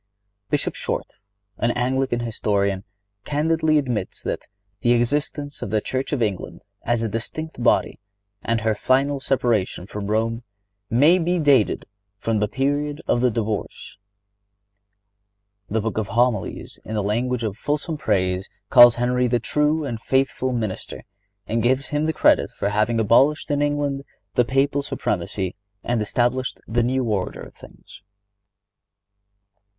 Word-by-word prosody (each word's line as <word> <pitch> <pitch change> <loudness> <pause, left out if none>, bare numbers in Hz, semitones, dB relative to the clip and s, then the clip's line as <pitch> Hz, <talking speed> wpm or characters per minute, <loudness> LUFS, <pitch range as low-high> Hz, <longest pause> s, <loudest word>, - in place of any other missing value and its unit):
Bishop - - 0
Short, - - -4 0.4
an 120 - +2
Anglican 125 0 0
historian, 100 -4 -1 0.4
candidly 155 +1 +1
admits 120 -9 -2
that - - -4 0.3
"the 120 +3 +3
existence 145 +4 -1
of - - -4
the 110 - +2
Church 130 +5 -3
of 135 -6 +1
England 100 -4 -3 0.2
as 120 -1 0
a - - 0
distinct 125 +8 -5
body, - - +2 0.4
and 115 +1 0
her 110 0 +2
final 135 +6 +1
separation 120 -9 0
from 100 0 -6
Rome, 115 +2 0 0.5
may 150 +10 +5
be 175 +1 +1
dated 140 -9 +3 0.3
from 110 +1 -1
the 105 - +1
period 145 +4 -1
of 120 - +2
the 125 - +4
divorce."(97) 110 -3 -4 1.8
The 110 - +2
Book 110 0 -2
of 105 - -2
Homilies, 120 -1 -1
in 110 - -5
the 105 - 0
language 120 +4 -1
of 105 -3 -2
fulsome 150 +6 -2
praise, 95 -7 0 0.2
calls 120 -1 +9
Henry 125 +1 +1
"the 120 0 +1
true 150 +5 +1
and 115 -5 -4
faithful 130 0 0
minister," 110 -6 -4 0.4
and 115 +3 -1
gives 130 +4 +1
him 150 0 0
the - - +2
credit - - +3
for 100 - -2
having 110 +3 +1
abolished 135 +9 +3
in 145 0 +1
England 145 -1 0 0.3
the 125 - +3
Papal 135 +3 +1
supremacy 95 -8 -2 0.3
and 120 -2 0
established 120 +4 0
the 120 +2 +1
new 130 +2 +1
order 105 -5 -2
of - - -12
things. - - -15
120 Hz, 145 wpm, -23 LUFS, 110-140 Hz, 1.8 s, calls